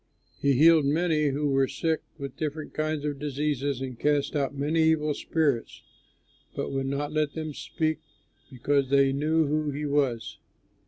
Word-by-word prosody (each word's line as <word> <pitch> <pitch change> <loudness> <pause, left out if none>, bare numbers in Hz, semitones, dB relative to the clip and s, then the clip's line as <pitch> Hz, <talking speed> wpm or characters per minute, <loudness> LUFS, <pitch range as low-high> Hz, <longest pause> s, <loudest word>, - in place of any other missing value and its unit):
He 140 0 +3
healed 155 +2 +6
many 155 +1 +2
who 145 +1 0
were 135 -1 +3
sick 160 +3 -1 0.2
with 140 -3 -7
different 155 0 -4
kinds 155 -1 -2
of 145 -2 -3
diseases, 145 -2 -2
and 130 -3 -6
cast 145 0 +1
out 140 -1 -1
many 150 +4 +1
evil 160 -1 +2
spirits, 145 -6 -1 0.7
but - - -3
would 135 -1 -2
not 145 +2 -2
let 155 -2 0
them 155 -2 -5
speak, 155 +5 -2 0.5
because 135 +1 0
they 140 -1 +4
knew 155 +3 +2
who 150 +1 0
he 145 +1 -3
was. 140 -5 -1
145 Hz, 160 wpm, -27 LUFS, 140-155 Hz, 0.7 s, healed